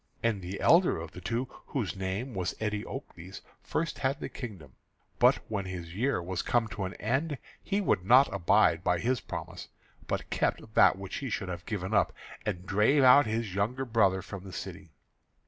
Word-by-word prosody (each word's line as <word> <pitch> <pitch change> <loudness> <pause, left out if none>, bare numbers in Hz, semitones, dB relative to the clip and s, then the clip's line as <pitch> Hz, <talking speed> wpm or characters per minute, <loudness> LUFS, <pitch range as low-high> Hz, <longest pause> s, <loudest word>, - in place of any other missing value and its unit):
And 110 -4 +1
the 90 +2 -6
elder 175 +2 +5
of 80 0 -7
the 90 - -10
two, 115 +8 -2 0.2
whose 115 -9 -2
name 95 +7 -3
was 90 -2 -2
Eteocles, 105 - -5 0.2
first 165 +1 -2
had 135 +1 0
the - - -5
kingdom; 100 - -8 0.5
but - - +6
when 100 -3 -3
his 85 -3 -6
year 125 +6 0
was 90 0 -2
come 120 -2 +1
to 105 -3 -4
an 95 - -6
end, 135 +7 -1 0.2
he 200 +1 -1
would 100 - +1
not 125 +8 +6
abide 95 -2 +3
by 90 - +2
his 125 +4 0
promise, - - -7 0.4
but - - -3
kept 110 - -1
that - - +6
which 95 -1 -6
he 135 - -4
should 100 -4 -3
have 90 -1 -6
given 100 -1 -3
up, - - +3 0.3
and 90 -3 -3
drave 110 +9 +3
out 130 0 +7
his 110 -3 -2
younger 115 +7 -1
brother 100 -6 +2
from 100 -2 -8
the 95 - -9
city. - - -7
105 Hz, 185 wpm, -29 LUFS, 95-125 Hz, 0.5 s, out